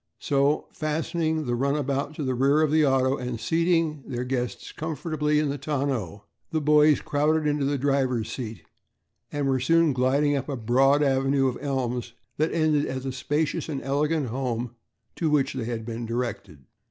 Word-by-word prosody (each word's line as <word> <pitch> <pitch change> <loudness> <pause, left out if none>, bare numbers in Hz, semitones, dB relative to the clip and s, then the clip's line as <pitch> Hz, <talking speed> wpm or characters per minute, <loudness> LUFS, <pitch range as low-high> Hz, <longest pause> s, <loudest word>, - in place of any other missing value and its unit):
So, 140 +2 +1
fastening 160 0 -1
the 120 - -1
runabout 140 +2 -1
to 150 - -4
the 130 -1 0
rear 140 +5 +3
of 150 - +1
the 155 0 +4
auto 135 0 +2
and 125 -2 -4
seating 165 +3 +1
their 125 -2 -3
guests 125 -1 -3
comfortably 155 -1 -1
in 150 -1 +1
the 140 0 -3
tonneau, 135 - -2 0.3
the 160 - 0
boys 150 0 +4
crowded 150 +2 +1
into 145 -1 +1
the 140 +1 0
driver's 130 -5 0
seat 110 -9 -6 0.7
and 145 -1 -1
were 135 -1 +2
soon 165 +3 +3
gliding 140 +3 +2
up 140 +1 -3
a 140 - -2
broad 135 +5 +3
avenue 135 0 +2
of 125 - -3
elms 125 -4 -2 0.2
that 155 +2 +1
ended 155 -3 +2
at 130 0 -4
the 135 - -3
spacious 145 +5 -1
and 140 -3 -4
elegant 145 0 0
home 125 -1 -2 0.5
to 165 - 0
which 150 -3 +2
they 130 -4 -3
had 115 -1 -4
been 115 0 -5
directed. 100 - -4
140 Hz, 175 wpm, -26 LUFS, 125-150 Hz, 0.7 s, the